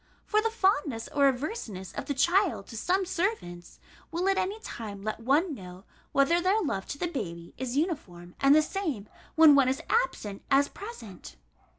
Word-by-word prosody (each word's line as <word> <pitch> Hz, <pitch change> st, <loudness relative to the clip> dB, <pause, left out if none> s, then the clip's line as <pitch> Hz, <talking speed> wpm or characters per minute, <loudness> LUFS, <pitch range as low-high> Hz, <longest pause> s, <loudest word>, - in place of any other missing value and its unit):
For 425 Hz, 0 st, +2 dB
the 450 Hz, -, +1 dB
fondness 295 Hz, -, 0 dB
or 280 Hz, -1 st, +3 dB
averseness 250 Hz, -, -3 dB
of -, -, -5 dB
the 285 Hz, -, -1 dB
child 345 Hz, -, +2 dB
to -, -, -9 dB
some 370 Hz, -, +1 dB
servants, 340 Hz, -, -3 dB, 0.3 s
will 345 Hz, +3 st, -1 dB
at 390 Hz, -, +2 dB
any 400 Hz, +4 st, -2 dB
time 205 Hz, -, -7 dB
let 215 Hz, +1 st, -3 dB
one 290 Hz, +8 st, +2 dB
know, 185 Hz, -5 st, -10 dB, 0.3 s
whether 305 Hz, +6 st, +3 dB
their 380 Hz, +4 st, +3 dB
love 195 Hz, -, -2 dB
to 280 Hz, -, -5 dB
the 350 Hz, -, -2 dB
baby 170 Hz, -, -5 dB
is 260 Hz, 0 st, -3 dB
uniform 185 Hz, -, -3 dB
and 275 Hz, +1 st, +6 dB
the 310 Hz, -, +5 dB
same, 305 Hz, -, -3 dB, 0.3 s
when 320 Hz, -2 st, +8 dB
one 275 Hz, -2 st, +5 dB
is 265 Hz, -, -2 dB
absent, 220 Hz, -, 0 dB
as 280 Hz, +1 st, +4 dB
present. 225 Hz, -, -10 dB
280 Hz, 180 wpm, -28 LUFS, -, 0.3 s, when